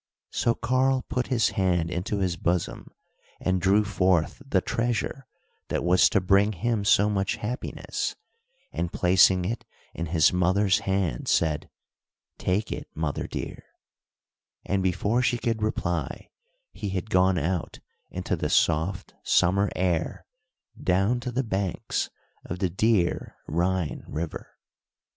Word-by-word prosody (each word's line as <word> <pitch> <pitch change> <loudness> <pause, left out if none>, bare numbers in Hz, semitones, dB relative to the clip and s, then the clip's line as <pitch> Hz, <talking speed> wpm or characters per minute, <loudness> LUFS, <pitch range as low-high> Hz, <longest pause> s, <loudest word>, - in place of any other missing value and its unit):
So 115 - +1
Karl 130 +1 +1
put 125 -1 -2
his 120 -3 +2
hand 90 -3 0
into 90 +4 -2
his 90 -2 0
bosom 90 -1 -1 0.5
and 95 -1 0
drew 100 +4 +4
forth 95 - +1
the 135 -9 +1
treasure 120 +5 -2 0.4
that - - -1
was 90 +1 +5
to 100 - +3
bring 100 +3 +3
him 105 +3 -1
so 100 0 +4
much 100 -2 0
happiness, 120 +4 -4 0.6
and 85 0 -2
placing 90 0 +4
it 115 +4 -3 0.3
in 85 - -4
his 80 0 +4
mother's 95 +2 +3
hand, 95 -4 -1
said: 75 -2 +1 0.7
"Take 95 +4 0
it, - - -5
mother, 80 -2 -2
dear;" - - -6 1.0
and 95 0 0
before 95 +6 +1
she 120 -1 +1
could 115 -2 -1
reply, 90 -6 -2 0.4
he 100 - -5
had 95 +2 -4
gone 90 0 +4
out 85 +3 -2 0.3
into - - -2
the - - -2
soft, 85 +4 +1
summer 100 +3 +3
air, 90 -3 -1 0.6
down 95 +7 +2
to 120 +1 -4
the 130 +3 0
banks 95 -5 -2 0.3
of 90 - -5
the 90 -2 -1
dear 95 -2 +1
Rhine 90 0 -1
River. 80 +1 -6
95 Hz, 135 wpm, -26 LUFS, 90-105 Hz, 1.0 s, was